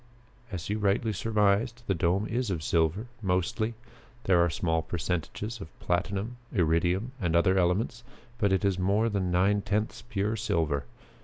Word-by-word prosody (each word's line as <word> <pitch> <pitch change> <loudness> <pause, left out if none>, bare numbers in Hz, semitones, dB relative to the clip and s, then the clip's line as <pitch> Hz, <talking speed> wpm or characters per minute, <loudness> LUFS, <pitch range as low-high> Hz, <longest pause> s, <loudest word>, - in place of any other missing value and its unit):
As 90 -4 -4
you 105 +1 -1
rightly 105 +2 +1
surmised, 110 +3 +1
the 100 - +1
dome 90 +4 +1
is 120 0 -1
of 85 -5 -2
silver 85 +7 +1 0.2
mostly. 95 +4 0 0.5
There 90 -3 +4
are 85 - +2
small 80 +1 0
percentages 90 +7 -3
of 80 - -11
platinum, 100 +6 -1
iridium, 90 +4 +1
and 85 -2 +1
other 95 +2 +4
elements, 105 +7 0 0.4
but 100 -2 +2
it 95 0 +2
is 95 -2 +1
more 100 +5 +2
than 100 -4 -1
nine 95 +3 +3
tenths 105 +3 -1
pure 110 -2 -1
silver. 80 - 0
95 Hz, 155 wpm, -28 LUFS, 85-110 Hz, 0.5 s, There